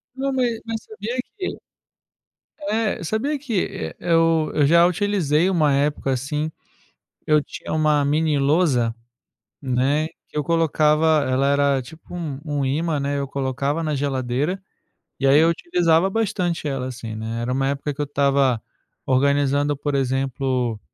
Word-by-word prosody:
Não, 275 Hz, +1 st, -1 dB
ma 260 Hz, -, 0 dB, 0.2 s
mas 225 Hz, -1 st, -4 dB
sabia 220 Hz, +4 st, -6 dB, 0.2 s
que 375 Hz, -, -4 dB, 1.1 s
É, 215 Hz, -5 st, 0 dB
sabia 230 Hz, -, -1 dB
que, 235 Hz, -9 st, -1 dB
eh, 80 Hz, -, -6 dB
eu 165 Hz, -2 st, +2 dB
eu 150 Hz, -, +3 dB
já 170 Hz, +4 st, +6 dB
utilizei 180 Hz, -3 st, +1 dB
uma 155 Hz, -6 st, +3 dB
época, 140 Hz, -1 st, 0 dB
assim. 150 Hz, +4 st, -2 dB, 0.7 s
Eu 150 Hz, -1 st, +4 dB
tinha -, -, -7 dB
uma 155 Hz, -2 st, +3 dB
mini 150 Hz, 0 st, +1 dB
lousa, 135 Hz, -5 st, +2 dB, 0.7 s
né, 135 Hz, +3 st, +1 dB, 0.2 s
que -, -, -13 dB
eu 150 Hz, -, +1 dB
colocava 155 Hz, -1 st, +3 dB
Ela 135 Hz, +2 st, +2 dB
era 140 Hz, -1 st, +2 dB
tipo 160 Hz, +7 st, -13 dB
um 155 Hz, -6 st, -4 dB
um 145 Hz, -3 st, -1 dB
ímã, 150 Hz, +3 st, 0 dB
né, 140 Hz, 0 st, -1 dB
eu 140 Hz, -, -3 dB
colocava 140 Hz, +3 st, -2 dB
na 155 Hz, -2 st, -1 dB
geladeira, 140 Hz, +5 st, -1 dB, 0.6 s
e 135 Hz, -, +2 dB
aí 140 Hz, +2 st, +6 dB
eu 165 Hz, +1 st, +5 dB
utilizava 170 Hz, +1 st, +2 dB
bastante 190 Hz, -7 st, -1 dB
ela, 135 Hz, -2 st, -2 dB
assim, 120 Hz, -3 st, -6 dB
né. 110 Hz, +1 st, -4 dB
Era 120 Hz, +2 st, -2 dB
uma 135 Hz, +1 st, 0 dB
época 140 Hz, +1 st, -2 dB
que 150 Hz, -, -5 dB
eu 145 Hz, -, 0 dB
estava 140 Hz, -4 st, +2 dB, 0.4 s
organizando, 140 Hz, +2 st, +2 dB
por 145 Hz, 0 st, -2 dB
exemplo, 130 Hz, -3 st, -1 dB
145 Hz, 150 wpm, -22 LUFS, 135-165 Hz, 1.1 s, já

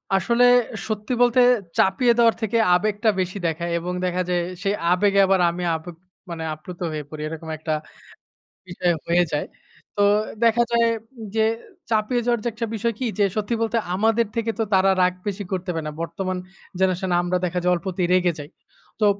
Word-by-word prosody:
আসলে 235 Hz, +6 st, +2 dB, 0.4 s
সত্যি 215 Hz, +2 st, -3 dB
বলতে, 245 Hz, +1 st, +4 dB, 0.4 s
চাপিয়ে 235 Hz, +6 st, +3 dB
দেওয়ার 230 Hz, -1 st, +5 dB
থেকে 220 Hz, +1 st, 0 dB, 0.2 s
আবেগটা 210 Hz, +4 st, +1 dB
বেশি 185 Hz, +1 st, -2 dB
দেখায় 170 Hz, +1 st, -3 dB
এবং 180 Hz, +2 st, -4 dB
দেখা 180 Hz, 0 st, 0 dB
যে, 180 Hz, -, +1 dB, 0.3 s
সেই 200 Hz, 0 st, +1 dB, 0.2 s
আবেগে 200 Hz, +2 st, +3 dB
আবার 190 Hz, -1 st, +3 dB
আমি 175 Hz, +1 st, -4 dB
আবেপ 165 Hz, +2 st, -8 dB, 0.3 s
মানে 165 Hz, -1 st, -5 dB
আপ্লুত 170 Hz, +3 st, -10 dB
হয়ে 155 Hz, -1 st, -4 dB
পড়ি, 155 Hz, 0 st, -8 dB
এরকম 160 Hz, +1 st, -7 dB
একটা 155 Hz, 0 st, -3 dB, 0.9 s
বিষয় 175 Hz, 0 st, 0 dB
হয়ে 175 Hz, +1 st, +4 dB
যায়। 150 Hz, -, -1 dB, 0.5 s
তো 205 Hz, -, 0 dB, 0.4 s
দেখা 235 Hz, +1 st, +4 dB
যায় 235 Hz, 0 st, +3 dB, 0.5 s
যে, 220 Hz, -, +3 dB, 0.5 s
চাপিয়ে 225 Hz, +2 st, +1 dB
যাওয়ার 240 Hz, -1 st, +2 dB
যে, -, -, -1 dB
একটা 230 Hz, +1 st, -3 dB
বিষয় 230 Hz, +2 st, -1 dB
কি? 260 Hz, -, -1 dB
যে, 205 Hz, -, +5 dB
সত্যি 215 Hz, +2 st, -1 dB
বলতে 230 Hz, +1 st, 0 dB, 0.2 s
আমাদের 225 Hz, +3 st, +2 dB
থেকে 230 Hz, -1 st, 0 dB
তো -, -, +3 dB
তারা 190 Hz, 0 st, +5 dB
রাগ 180 Hz, 0 st, +3 dB
বেশি 205 Hz, 0 st, -3 dB
করতে 185 Hz, -1 st, -3 dB
পারে 160 Hz, -2 st, -4 dB
না। -, -, -4 dB
বর্তমান 185 Hz, +3 st, -3 dB, 0.4 s
জেনারেশন 190 Hz, 0 st, +1 dB
এ -, -, +3 dB
আমরা 180 Hz, +1 st, 0 dB
দেখা 180 Hz, +1 st, -1 dB
যায় 180 Hz, -, +3 dB
অল্পতেই 180 Hz, 0 st, -2 dB
রেগে 180 Hz, -1 st, +3 dB
যাই। 145 Hz, 0 st, -8 dB, 0.5 s
তো 215 Hz, -, +3 dB
190 Hz, 180 wpm, -23 LUFS, 175-225 Hz, 0.9 s, দেওয়ার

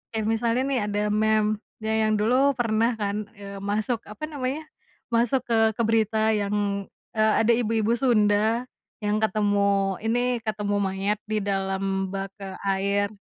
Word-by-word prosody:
Kayak 220 Hz, -1 st, -1 dB
misalnya 230 Hz, +2 st, +1 dB
nih 255 Hz, -, +1 dB
ada 205 Hz, 0 st, -1 dB
meme 215 Hz, 0 st, +2 dB, 0.2 s
ya 220 Hz, 0 st, 0 dB
yang 215 Hz, -, +2 dB
dulu 255 Hz, +6 st, +3 dB
pernah 230 Hz, -1 st, +1 dB
kan, 205 Hz, 0 st, -3 dB
eee, 200 Hz, -1 st, -8 dB
masuk, 210 Hz, +4 st, -1 dB
apa 210 Hz, +8 st, -10 dB
namanya, 290 Hz, 0 st, -3 dB, 0.5 s
masuk 240 Hz, +2 st, +2 dB
ke 225 Hz, -2 st, +2 dB
ke -, -, -1 dB
berita 220 Hz, 0 st, +2 dB
yang, 205 Hz, -1 st, -1 dB, 0.2 s
eee, 215 Hz, -1 st, +2 dB
ada 235 Hz, -, +4 dB
ibu-ibu 225 Hz, -1 st, +1 dB
Sunda 220 Hz, -1 st, +3 dB, 0.4 s
yang 210 Hz, +1 st, +1 dB
ketemu 200 Hz, -2 st, +1 dB
ini, 245 Hz, +2 st, 0 dB
ketemu 210 Hz, -2 st, -2 dB
mayat 195 Hz, +1 st, -1 dB
di 215 Hz, -2 st, -1 dB
dalam 195 Hz, -1 st, -1 dB
bak, 195 Hz, 0 st, -4 dB
eee, 190 Hz, -1 st, -7 dB, 0.2 s
air. 200 Hz, +1 st, +1 dB
215 Hz, 150 wpm, -25 LUFS, 200-225 Hz, 0.5 s, ada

